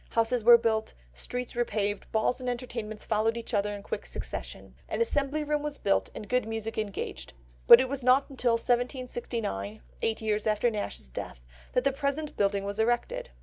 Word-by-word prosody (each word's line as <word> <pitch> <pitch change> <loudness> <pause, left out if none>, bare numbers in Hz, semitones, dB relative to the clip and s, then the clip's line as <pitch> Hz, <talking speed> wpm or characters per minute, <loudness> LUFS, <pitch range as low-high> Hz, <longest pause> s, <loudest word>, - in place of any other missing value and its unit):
Houses 230 +1 +2
were 235 +1 +9
built, 220 -1 -1 0.2
streets 245 - -5
repaved, 210 -4 -1
balls 220 +3 +1
and 250 -1 -3
entertainments 235 -3 -5
followed 225 +1 +1
each 230 - -6
other 205 0 +1
in 200 - -9
quick - - -5
succession. - - -6 0.2
An - - -2
Assembly 300 -9 +1
Room 295 0 0
was 295 -1 -3
built, 195 - +1
and 210 - -7
good 250 -1 +1
music 225 0 -4
engaged; 210 -2 -4 0.3
but - - +12
it 260 - +1
was 275 +1 -3
not 255 +2 +5
until 250 -3 +1
1769, 235 - -2 0.2
eight 220 - 0
years 215 -1 -1
after 215 +3 +2
Nash's 205 - -4
death, - - -7 0.3
that 250 - +2
the 275 - +3
present 280 +2 -2
building 200 -1 +1
was 200 +1 -4
erected. 240 - 0
230 Hz, 180 wpm, -29 LUFS, 210-255 Hz, 0.3 s, but